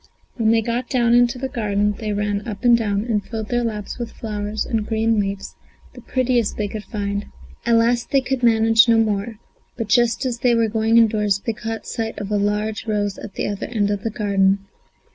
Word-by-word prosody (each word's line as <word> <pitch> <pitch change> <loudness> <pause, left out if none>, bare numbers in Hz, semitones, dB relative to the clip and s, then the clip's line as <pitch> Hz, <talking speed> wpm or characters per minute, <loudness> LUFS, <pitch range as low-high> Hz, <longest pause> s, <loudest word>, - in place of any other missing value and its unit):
When 225 -3 +1
they 225 0 +3
got 240 +3 -2
down 240 -3 +2
into 245 +1 +4
the 265 +1 -3
garden 210 -4 0
they 215 -2 -3
ran 205 +1 -2
up 205 -3 -6
and 240 -1 +7
down, 205 -3 0
and 220 -3 -1
filled 220 0 -6
their 240 -1 0
laps 215 0 -4
with 235 -1 -4
flowers 210 -1 -4
and 220 -3 -2
green 225 0 +1
leaves, 200 -1 -3 0.4
the - - -12
prettiest 250 -4 0
they 210 - -1
could 210 +1 -7
find. 200 -2 -3 0.4
At 235 - +4
last 235 +1 +2
they 275 - +3
could 260 0 -2
manage 225 -1 +5
no 230 - +5
more, 220 0 0 0.4
but 230 -3 -4
just 240 +3 +2
as 240 -2 -2
they 240 -1 +3
were 230 -1 +2
going 225 +1 +2
indoors 210 -3 +3
they 230 - 0
caught 225 0 -5
sight 225 -1 -4
of 205 0 -5
a 210 - +2
large 210 +2 -1
rose 205 -2 -1
at 210 - -9
the - - -2
other 205 -1 -4
end 205 -4 0
of 205 -1 -2
the 225 - -2
garden. 195 -2 +1
220 Hz, 215 wpm, -21 LUFS, 205-235 Hz, 0.4 s, and